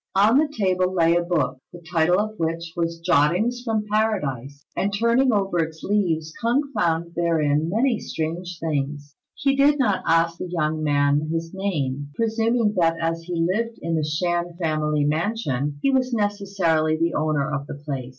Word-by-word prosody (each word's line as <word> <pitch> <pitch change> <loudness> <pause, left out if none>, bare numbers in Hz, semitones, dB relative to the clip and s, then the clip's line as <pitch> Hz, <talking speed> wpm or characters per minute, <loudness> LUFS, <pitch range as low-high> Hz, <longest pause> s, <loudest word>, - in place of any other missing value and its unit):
On 215 +7 +5
the 310 - +3
table 185 -9 0
lay 170 -2 +3
a 175 - +3
book, 150 -7 -1
the 175 - -10
title 170 +2 +3
of 215 +1 -1
which 165 0 -2
was, 165 -1 -2
"Jottings 185 +12 +2
from 220 -3 -1
Paradise;" 150 - -1
and 200 - 0
turning 235 +5 +3
over 195 -4 0
its 160 0 -3
leaves, 165 -6 0
K'ung 240 +5 +2
found 170 0 0
therein 160 -2 +1
many 230 +4 +1
strange 170 +2 -4
things. 145 -2 -3 0.2
He 275 -1 +1
did 285 +2 +4
not 215 -9 +1
ask 165 0 +2
the 180 - -5
young 155 -2 -1
man 145 0 +2
his 165 +1 -3
name, 145 -8 -2
presuming 225 0 +1
that 165 -1 +2
as 165 0 -1
he 170 -1 -1
lived 230 +2 -2
in 165 0 -1
the 155 - 0
Shan 175 +3 -1
family 155 -3 0
mansion, 150 - -1
he 275 - +3
was 255 -1 +1
necessarily 195 -7 0
the 165 +1 0
owner 150 -2 0
of 140 0 -3
the - - -6
place. 140 -3 -5
170 Hz, 170 wpm, -23 LUFS, 155-205 Hz, 0.2 s, On